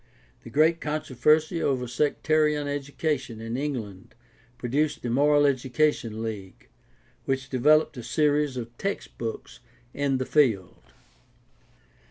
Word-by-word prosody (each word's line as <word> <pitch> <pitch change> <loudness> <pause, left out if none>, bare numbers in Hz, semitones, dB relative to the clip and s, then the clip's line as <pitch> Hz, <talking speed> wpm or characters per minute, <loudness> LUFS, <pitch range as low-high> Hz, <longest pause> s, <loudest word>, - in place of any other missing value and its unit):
The - - -10
great 160 +3 +3
controversy 155 +2 +1
over 130 -3 0
sectarian 150 +3 +1
education 145 -3 -3
in 115 +1 -5
England 120 -9 -5 0.4
produced 145 +5 -1
the 120 - -2
Moral 145 +3 +4
Education 130 -4 0
League, 100 -5 -7 0.6
which 135 0 -2
developed 150 +3 +3
a - - -5
series 145 +2 +1
of 120 -1 -6
textbooks 120 - -5 0.3
in 140 -2 0
the 130 - -2
field. 115 - +1
140 Hz, 110 wpm, -26 LUFS, 120-150 Hz, 0.6 s, Moral